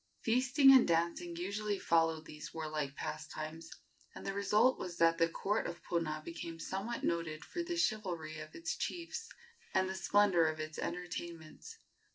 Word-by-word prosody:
Feasting 265 +4 +6
and 260 - +7
dancing 170 +1 0
usually 200 +4 -2
followed 165 -3 +2
these 150 0 -9
warlike 155 -3 -3
pastimes, 155 +1 -5 0.5
and - - -9
the 195 - -2
result 210 +5 +3
was 175 -2 -5
that 165 0 +4
the 165 0 +4
court 205 +5 -1
of 175 0 -7
Puna 155 -3 -1
became 165 0 -6
somewhat 195 +7 -4
noted 165 -2 -1
for 350 - -4
the 345 0 -3
chivalry 175 - -1
of 155 0 -9
its 330 -1 -3
chiefs 360 +7 -4 0.5
and 190 0 +3
the 190 - -3
splendor 190 -3 +4
of 155 0 -2
its 155 0 -5
entertainments. 170 - -6
170 Hz, 160 wpm, -34 LUFS, 160-210 Hz, 0.5 s, and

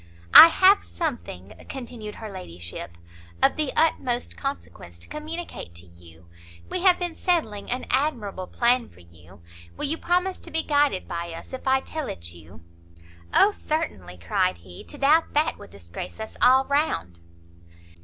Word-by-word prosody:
"I - - +13
have 380 +4 +5
something," 175 - -5 0.2
continued 235 -5 -7
her 220 -2 -8
ladyship, 85 - -9 0.4
"of - - +3
the 305 -3 -1
utmost 260 -6 +1
consequence 275 - -7
to 85 - -11
communicate 310 - -7
to 85 +1 -7
you. 85 -1 -17 0.4
We 365 - -1
have 370 -1 +5
been 350 -2 -3
settling 310 - -1
an 250 +1 -2
admirable 235 -9 -1
plan 240 0 +1
for 90 - -19
you; 85 +2 -18 0.4
will - - -1
you 320 +3 -1
promise 360 +2 0
to - - -11
be 320 0 0
guided 290 -9 +1
by 170 0 -5
us 165 - -10
if 260 +1 -7
I 265 0 +3
tell 310 +2 -5
it 85 -1 -6
you?" 85 -1 -15 0.7
"O 415 - +5
certainly!" 100 - -4
cried 85 +1 0
he; 90 +1 -13
"to 290 - -9
doubt 295 +4 +3
that 300 +2 +1
would - - -12
disgrace 90 - -9
us 220 - -7
all 260 +1 +6
round." 280 - -1
240 Hz, 160 wpm, -25 LUFS, -, 0.7 s, I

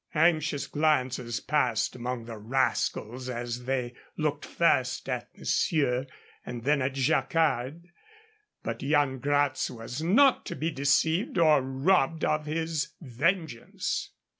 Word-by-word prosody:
Anxious 155 -3 +2
glances 130 -6 0
passed 150 -3 0
among 125 -1 -4
the 115 -2 -8
rascals 125 +1 -1
as 120 0 -4
they 125 -2 -1 0.2
looked 150 -2 -1
first 130 -7 +1
at - - -3
monsieur 135 -5 +1 0.4
and 120 -2 -7
then 145 +1 +2
at 130 +1 -1
Jacquard. 150 +2 +1 0.8
But - - -4
Yan 140 -2 +1
Gratz 145 0 +1
was 120 +3 -6
not 240 - +4
to - - -4
be 160 +4 -2
deceived 155 +7 +1
or 155 -4 +5
robbed 135 +4 +1
of 150 0 0
his 155 -2 -2
vengeance. 160 0 -2
140 Hz, 120 wpm, -28 LUFS, 125-155 Hz, 0.8 s, or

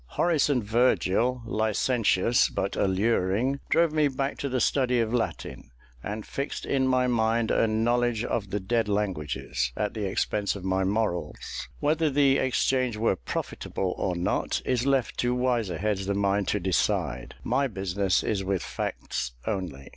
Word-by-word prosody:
Horace 165 -5 +3
and 130 -5 +1
Virgil, 120 +1 +2
licentious 110 0 +2
but 100 +1 -2
alluring, 105 +6 +1
drove 165 -2 +3
me 155 -1 +3
back 135 0 -3
to 140 - -2
the 130 0 0
study 125 -1 +2
of 115 0 0
Latin, 120 -2 -3 0.3
and 105 - -5
fixed 140 +1 -4
in 130 -1 +1
my 130 -1 +3
mind 115 -1 +1
a 115 - +3
knowledge 120 +1 +1
of 105 -5 -2
the 105 - -1
dead 110 +2 0
languages, 75 -10 -1
at 105 - -1
the 105 -3 -2
expense 100 +2 -1
of 100 - -7
my 95 0 +1
morals. 95 - -2
Whether 155 +2 +2
the 140 -1 +3
exchange 130 -2 +1
were 110 -3 +2
profitable 90 0 -3
or 90 -2 -1
not, 85 +1 0
is 125 +1 0
left 135 -3 +1
to 125 0 +1
wiser 120 -8 0
heads 100 +1 -1
than 100 0 0
mine 100 0 +1
to 105 - 0
decide; 75 -8 -1
my 140 0 +1
business 95 -3 0
is 100 -3 -1
with 95 -1 -1
facts - - -4
only. 90 -11 -4
110 Hz, 160 wpm, -27 LUFS, 95-125 Hz, 0.3 s, Horace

